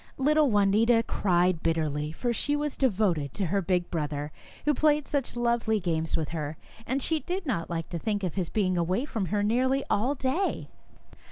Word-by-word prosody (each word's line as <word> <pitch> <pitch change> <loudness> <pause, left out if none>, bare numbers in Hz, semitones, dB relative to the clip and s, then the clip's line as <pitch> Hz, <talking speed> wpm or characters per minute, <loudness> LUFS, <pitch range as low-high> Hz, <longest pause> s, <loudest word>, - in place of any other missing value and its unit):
Little 300 +1 +3
Juanita 215 +3 +4
cried 180 -3 +1
bitterly, 155 -2 -1
for 240 +9 -2
she 290 +5 0
was 295 -1 -2
devoted 190 - +1
to 200 - -1
the 195 +4 0
big 180 -1 0
brother 150 -2 -3 0.3
who 300 - +4
played 300 +1 +2
such 280 -4 -2
lovely 235 -2 +1
games 165 -3 -1
with 160 -2 -2
her, 155 -2 -4 0.3
and 260 +2 0
she 320 -1 +1
did 360 +3 -4
not 200 - -2
like 165 -1 -3
to 170 - -4
think 205 +1 -2
of 180 - -1
his 185 -4 -2
being 185 -4 +1
away 185 - 0
from 220 -9 -3
her 205 +3 0
nearly 260 +5 +2
all 250 +8 +1
day. 270 +9 -1
205 Hz, 185 wpm, -28 LUFS, 170-260 Hz, 0.3 s, Juanita